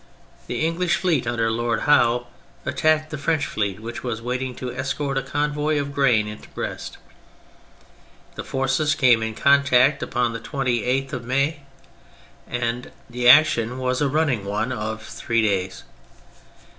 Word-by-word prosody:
The - - -1
English 170 +2 +1
fleet 160 -10 0
under 115 -2 0
Lord 115 0 -1
Howe 120 -4 +3 0.4
at - - -4
tacked 155 0 +2
the 155 - -5
French 155 +1 0
fleet 100 -2 -2
which 115 +1 -7
was 120 -3 -3
waiting 125 +2 -3
to 125 0 -5
escort 135 +2 -3
a 135 - +1
convoy 150 +2 -1
of 140 0 -4
grain 125 -7 +3
into 105 0 -9
Brest; - - -6 1.4
the - - -6
forces 135 +3 0
came 125 -6 +4
in 110 0 -3
contact 140 +1 +4
upon 120 -1 -1
the 115 - -4
28th 130 0 -1
of 125 -3 -5
May, 140 +5 0 0.9
and 120 0 -3 0.2
the 120 0 +3
action 125 -4 +5
was 130 +1 -1
a 145 - +2
running 145 -7 +1
one 105 +5 -2
of 110 -2 -4
three 115 +1 -1
days. 95 -3 -1
125 Hz, 150 wpm, -23 LUFS, 115-145 Hz, 1.4 s, action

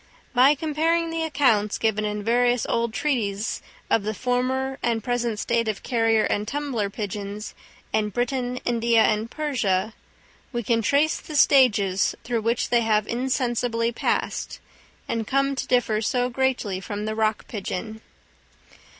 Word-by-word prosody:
By 260 +4 +6
comparing 325 +3 0
the 330 0 -2
accounts 250 -10 +2
given 215 -1 0
in 210 0 -3
various 245 +2 +2
old 235 0 0
treatises 220 -6 -1 0.3
of 225 - +2
the 215 +1 -3
former 260 +2 -1
and 230 -2 0
present 240 -3 -1
state 230 +1 0
of 215 -2 -3
carrier 225 -2 +2
and 210 +1 -1
tumbler 270 -7 -2
pigeons 205 0 -5 0.4
in 215 -1 +1
Britain, 245 +3 -2
India, 235 -1 +3
and 215 +1 +1
Persia, 225 -9 -1 0.6
we 240 -2 -2
can 230 +2 +1
trace 285 +7 +2
the 310 - -8
stages 215 -10 +4
through 235 -2 -1
which 230 +2 0
they 240 -1 +4
have 215 -2 +2
insensibly 240 -2 0
passed, 235 - -2 0.5
and 225 -1 -2
come 275 +1 +1
to - - -3
differ 230 -4 +2
so 245 +3 0
greatly 250 -7 -1
from 205 +2 -5
the 215 - -2
rock 215 -1 0
pigeon. 215 +1 -5
235 Hz, 145 wpm, -24 LUFS, 215-255 Hz, 0.6 s, By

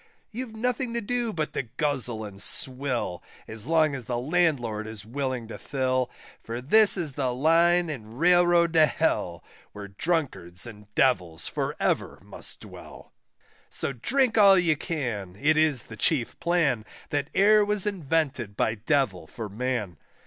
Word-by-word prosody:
You've 230 0 -6
nothing 245 +1 -2
to - - +1
do 240 +1 -1
but 155 -5 -3
to - - -1
guzzle 125 -3 -2
and 100 -1 -8
swill, 130 -8 +2 0.3
As 110 -1 -1
long 160 -2 +3
as 130 -4 -6
the 120 +1 -2
Landlord 125 -7 0
is 110 -1 -7
willing 130 -1 -3
to - - -8
fill, 130 -2 -1 0.3
For 115 +1 -5
this 200 - +4
is 165 -5 -2
the 130 -2 -2
Line 170 +6 +3
and 135 -9 -6
the 110 +2 -13
Railroad 175 +2 +4
to 160 -2 +6
Hell, - - -1 0.3
Where 100 -1 -8
Drunkards 125 - -2
and 105 -3 -11
Devils 90 -12 +1
for - - -3
ever - - -1
must - - -5
dwell; - - -12 0.6
So 140 - -3
drink 235 - +1
all 195 -2 +7
you 170 -3 +3
can, 120 - -4
it 155 +3 +3
is 155 -6 +2
the 110 - -11
chief 130 0 +1
plan, 165 -10 +1 0.3
That 145 0 -1
e'er 210 +2 +5
was 205 -1 -1
invented 145 - -1
by 110 - +1
Devil 110 - -1
for 110 +4 -7
man. 110 - -3
140 Hz, 160 wpm, -26 LUFS, 115-170 Hz, 0.6 s, all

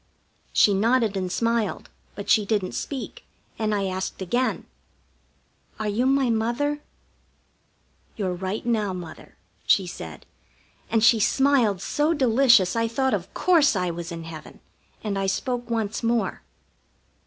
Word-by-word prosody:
She 205 - +4
nodded 225 +1 +2
and 185 -2 -2
smiled, 230 -4 -1 0.2
but 200 - -7
she 215 - +4
didn't 200 -3 -1
speak, 275 -3 -5 0.4
and 215 -1 0
I 200 -1 -1
asked 190 0 -4
again: 240 +8 -1 1.1
"Are 215 - -2
you 225 +5 +1
my 270 -2 +2
Mother?" 240 +7 -1 1.3
"Your 190 -4 -2
right 190 +5 -4
now 215 -5 0
Mother," 175 -3 -9 0.3
she - - +3
said, - - -9 0.6
and 225 -2 +2
she 230 -1 +6
smiled 245 -6 +2
so 305 +3 +1
delicious 245 - +4
I 230 0 +1
thought 265 +3 0
of - - -3
course 325 -9 +4
I 180 -2 0
was 170 +1 -6
in 165 -1 -6
heaven, 160 -1 -10 0.4
and 200 -2 -2
I 195 - -1
spoke 245 +5 -2
once 220 -3 -2
more. 230 -1 0
220 Hz, 140 wpm, -24 LUFS, 195-245 Hz, 1.3 s, she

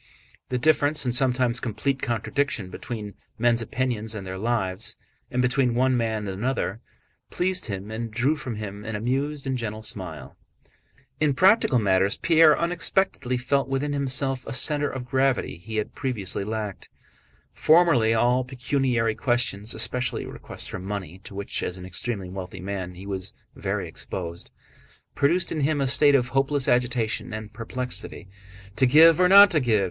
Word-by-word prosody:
The 125 - -1
difference, 150 +1 +2
and 125 - 0
sometimes 125 -1 +2
complete 130 +4 -2
contradiction, 115 -3 -2
between 105 -2 -6 0.2
men's 120 0 +2
opinions 115 -2 -2
and 100 -2 -6
their 95 0 -6
lives, 105 -3 0 0.3
and 125 0 0
between 125 -1 +1
one 130 +1 +2
man 110 -3 -1
and - - -3
another, 110 +1 -2 0.5
pleased 185 -2 -1
him 100 0 -5
and 115 +1 -4
drew 130 +7 +1
from 125 -6 -5
him 105 -1 -7
an 110 0 -5
amused 135 +6 -2
and 135 -1 -1
gentle 110 -1 -5
smile. 90 -9 -5 0.8
In 150 -3 +2
practical 190 - +4
matters 95 -2 +2
Pierre 160 -2 +5
unexpectedly 170 -6 0
felt 130 +1 0
within 140 +2 -1
himself 135 -1 -1
a 115 - -4
center 145 +3 +1
of 130 -2 -6
gravity 130 -4 0
he 110 +5 -8
had 105 -1 -2
previously 105 -8 -3
lacked. 105 -2 -5 0.6
Formerly 155 -9 +4
all 120 +3 +2
pecuniary 125 -3 0
questions, 115 -4 0
especially 125 0 0
requests - - -4
for - - -6
money 95 -2 -6
to 100 - -10
which, 100 0 -3
as 90 - -4
an 90 - -9
extremely 95 +2 -4
wealthy 90 0 -7
man, 95 -1 -5
he 95 +2 -10
was 95 -2 -5 0.2
very - - -3
exposed, 85 -2 -7 0.6
produced 165 +6 +1
in 160 - -2
him 145 +1 +1
a 135 - +1
state 140 +2 +4
of 125 -2 +2
hopeless 135 +1 +1
agitation 120 -3 0
and 110 0 -8
perplexity. 125 -4 -5 0.5
"To 130 - +4
give 160 +5 +7
or 180 0 +5
not 200 +1 +9
to 155 - +3
give?" 115 -6 +2
120 Hz, 160 wpm, -25 LUFS, 105-135 Hz, 0.8 s, not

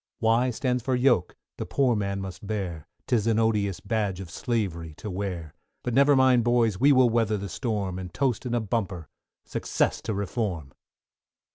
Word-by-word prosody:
=Y= 115 +3 +3
stands 125 +1 -1
for 130 +2 0
Yoke, 125 -8 +2 0.2
the - - -4
poor 130 -4 +2
man 100 -1 -2
must 95 +1 -7
bear, 95 -7 -4 0.2
'Tis 115 -3 +1
an 115 -1 +3
odious 105 -4 +1
badge 105 -5 -1
of 90 -3 -8
slavery 90 - -2
to 105 - -6
wear; 90 -5 -4 0.3
But 125 - -2
never 140 +3 +5
mind, 130 -2 +5
boys! 115 -4 +2
we 140 +4 +6
will 130 -3 +5
weather 110 -2 +1
the 100 0 -5
storm, 100 -5 -2
And 90 -1 -7
toast 135 -5 0
in 120 - -1
a - - +2
bumper, 100 -7 -3 0.4
success - - -1
to 110 - -3
Reform! 95 - -3
110 Hz, 175 wpm, -26 LUFS, 95-120 Hz, 0.4 s, we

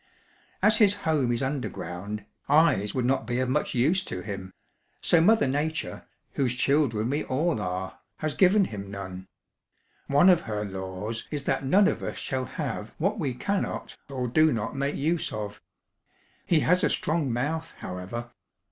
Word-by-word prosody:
"As 215 +1 +6
his 205 -2 +5
home 145 -6 +2
is 120 +3 0
underground, 105 - -4 0.2
eyes 145 -9 +4
would 125 -2 +1
not 130 -2 +1
be 120 0 -1
of 130 0 0
much 150 +1 0
use 155 +10 +3
to 90 - -4
him, 95 -2 -6 0.5
so 170 - +4
Mother 220 +6 +5
Nature, 150 +4 -2 0.3
whose 125 -3 +1
children 130 -5 +2
we 145 - 0
all 150 -2 0
are, 95 0 -4 0.2
has 155 -1 -2
given 195 +3 +5
him 100 - -6
none. 95 -1 -7 0.8
One 145 +6 +5
of 180 -3 +6
her 105 0 -2
laws 95 +3 -5
is 145 -2 -3
that 135 - -1
none 195 +9 +5
of - - -1
us - - -4
shall 130 -1 -2
have 130 -5 -5
what 200 +6 0
we 135 -7 -1
cannot 200 +9 -2
or 130 -2 -2
do 155 +6 +4
not 115 +2 -2
make 140 +1 -1
use 160 +3 0
of. 105 -1 -5 0.9
He 165 -4 +4
has 180 +2 +3
a - - +4
strong 155 -4 0
mouth, 160 +7 -2
however. 110 +7 -6
130 Hz, 165 wpm, -27 LUFS, 105-160 Hz, 0.9 s, As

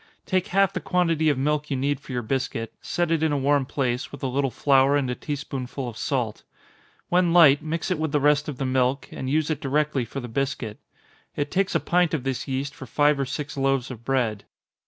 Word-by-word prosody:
Take 185 -2 0
half 195 +1 +2
the 185 - -2
quantity 165 -4 +1
of 145 - +1
milk 150 +2 0
you 135 - -1
need 140 +1 0
for 140 - -11
your 125 -1 -2
biscuit 115 -1 -2
set 175 -2 -1
it 165 -2 +2
in 160 -1 +2
a 145 - +1
warm 140 -1 +2
place, 130 -3 -2
with 140 - -10
a - - +1
little 135 +2 0
flour, 135 +1 +3
and 140 -2 0
a - - 0
tea 145 +4 -4
spoonful 135 -2 -5
of 120 - -6
salt. 120 -3 -2 0.7
When 175 -1 +3
light, 155 -4 +7
mix 165 +4 -3
it 180 - 0
with 160 -1 -1
the 150 - +2
rest 145 +1 +3
of 140 - -6
the 135 - -2
milk, 130 +1 +1
and 130 - -5
use 155 +2 +1
it 155 - -2
directly 145 -1 0
for 120 +4 -6
the 120 - -6
biscuit. 120 -3 -3 0.6
It 145 0 -2
takes 195 +1 0
a - - +4
pint 175 -2 +2
of 140 - -4
this 135 0 -3
yeast 135 +1 -2
for 135 - -10
five 145 -1 +3
or 135 - +1
six 150 +2 -5
loaves 135 -2 0
of 115 -2 -9
bread. 120 -5 0
140 Hz, 235 wpm, -25 LUFS, 130-150 Hz, 0.7 s, light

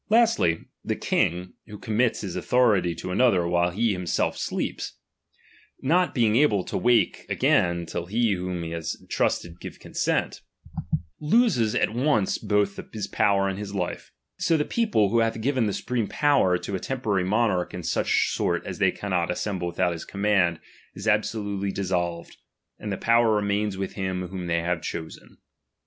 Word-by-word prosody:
Lastly, 220 - +3 0.2
the - - -1
king, 90 +2 0
who 105 - -9
commits 110 +4 0
his 95 -4 -5
authority 105 -9 +2
to 90 +3 -6
another 95 -5 +3
while 85 0 +2
himself 95 -2 0
sleeps, - - -4 0.9
not 175 +6 +2
being 115 -4 +3
able 115 -8 +3
to - - -6
wake 120 -1 +2
again 85 -1 +2
till 85 +1 -5
he 115 +3 +1
whom 90 -2 -2
he 80 0 -5
entrusted 85 +1 -2
give - - -9
consent, - - -1 0.8
loses 150 - +2
at - - +2
once 120 -5 +1
both 105 -1 0
his 105 -3 -4
power 100 0 +2
and 95 0 -3
his 100 -1 -6
life; 90 -3 -4 0.3
so 180 -3 +2
the 150 - 0
people, 215 - +1
who 115 - +3
hath 115 0 0
given 125 -1 +1
the - - 0
supreme 120 -1 -2
power 145 -12 +3
to 100 - -6
a 95 - -1
temporary 110 -8 -1
monarch 100 -2 +1
in - - -6
such - - +1
sort - - -1
as - - -6
they - - +4
cannot 90 -4 -2
assemble 90 -1 -2
without 85 0 0
his 85 - -6
command, 100 -4 +1 0.4
is - - -6
absolutely 100 -3 0
dis 95 -1 -3
solved, 85 -2 -2 0.4
and 105 - -5
the 95 - -2
power 115 -1 +3
remains 105 0 0
vrith 95 0 -3
him 95 -2 -3
whom 90 -1 -5
they 85 0 0
have 85 -1 -1
chosen. 80 -2 -7
100 Hz, 165 wpm, -25 LUFS, 90-115 Hz, 0.9 s, they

